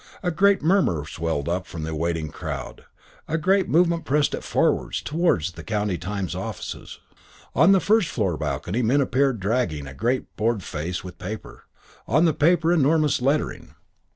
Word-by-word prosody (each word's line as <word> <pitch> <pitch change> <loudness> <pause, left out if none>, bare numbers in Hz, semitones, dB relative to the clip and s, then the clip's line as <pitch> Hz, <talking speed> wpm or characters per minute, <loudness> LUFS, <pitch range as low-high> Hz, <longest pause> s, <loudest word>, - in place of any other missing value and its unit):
A 180 - +1
great 200 +1 +3
murmur 160 - +2
swelled 80 -2 -3
up 90 +2 -2
from 80 -2 -6
the 80 0 -4
waiting 80 0 -2
crowd, - - -6 0.4
a 160 - 0
great 190 +4 +2
movement 170 0 +3
pressed 145 0 +1
it - - -4
forward - - +1
towards 150 - 0
the - - -10
County 105 -3 -1
Times 100 -2 -3
offices. - - -6 0.6
On 165 +7 +5
the 195 - +6
first 215 -1 +3
floor 95 -8 -1
balcony 100 +8 -2
men 125 +5 +3
appeared 135 -2 +1
dragging 95 - -1
a 70 - -9
great 120 - -2
board 110 -2 0
faced 85 +4 -4
with 90 -1 -10
paper, 90 - -8 0.4
on 155 +8 +3
the 160 - +3
paper 165 +2 +3
enormous 155 -2 +2
lettering. 140 +4 -1
125 Hz, 165 wpm, -24 LUFS, -, 0.6 s, the